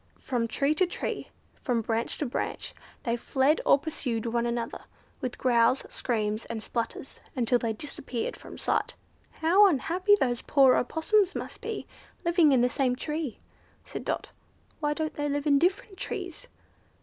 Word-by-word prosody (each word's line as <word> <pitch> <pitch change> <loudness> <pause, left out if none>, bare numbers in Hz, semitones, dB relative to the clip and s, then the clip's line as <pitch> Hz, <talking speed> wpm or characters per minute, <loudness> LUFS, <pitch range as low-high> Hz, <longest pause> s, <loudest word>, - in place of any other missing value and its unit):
From 240 -3 -1
tree 275 +5 +1
to 365 +4 +2
tree, - - -4 0.3
from 240 -4 -1
branch 225 +1 -1
to 300 - -1
branch, 250 - -3 0.3
they 235 -3 +1
fled 265 +5 +2
or - - +7
pursued 265 -7 -3
one 235 0 0
another, 235 -1 -3 0.3
with 250 - -4
growls, 240 0 +3
screams, 215 -3 -1
and 220 -2 -5
splutters, 235 +3 -4 0.2
until 245 -1 +2
they 230 -1 -1
disappeared 245 0 -4
from - - -11
sight. - - 0 0.4
"How 370 +6 +5
unhappy 365 +5 +3
those 245 -2 +1
poor 270 -3 +5
Opossums 380 - +2
must - - -6
be, - - -4 0.4
living 340 -3 +5
in 260 -3 +5
the 245 - +5
same 250 -1 +1
tree," 300 -1 -4 0.4
said - - -6
Dot; - - -3 0.5
"why 295 -1 0
don't 315 0 -2
they 290 0 -2
live 285 +1 -1
in 285 -2 +5
different 380 +3 0
trees?" 380 +1 -5
270 Hz, 160 wpm, -28 LUFS, 235-320 Hz, 0.5 s, or